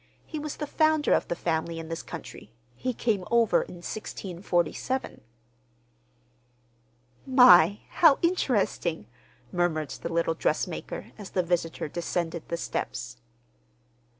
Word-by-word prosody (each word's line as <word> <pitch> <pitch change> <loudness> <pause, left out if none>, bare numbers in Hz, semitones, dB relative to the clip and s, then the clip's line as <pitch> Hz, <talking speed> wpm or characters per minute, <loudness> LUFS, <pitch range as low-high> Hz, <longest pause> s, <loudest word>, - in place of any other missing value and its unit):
He 310 - -5
was 295 0 -5
the 300 - -4
founder 310 0 +2
of - - +1
the 175 - -2
family 165 -1 -2
in 165 -1 -6
this 165 0 -4
country. 105 - -9 0.2
He 255 - -2
came 225 -5 0
over 235 -2 +4
in 175 -1 -9
1647." 185 +5 -3 2.1
"My, 215 - +7
how 320 -5 +5
interesting!" 210 - 0 0.5
murmured 160 -5 0
the 170 - -5
little 165 0 +1
dressmaker, 160 +1 -2
as 205 - -8
the 185 - 0
visitor 170 -2 -1
descended 170 +1 -3
the 170 - -1
steps. - - -4
175 Hz, 120 wpm, -27 LUFS, 165-250 Hz, 2.1 s, My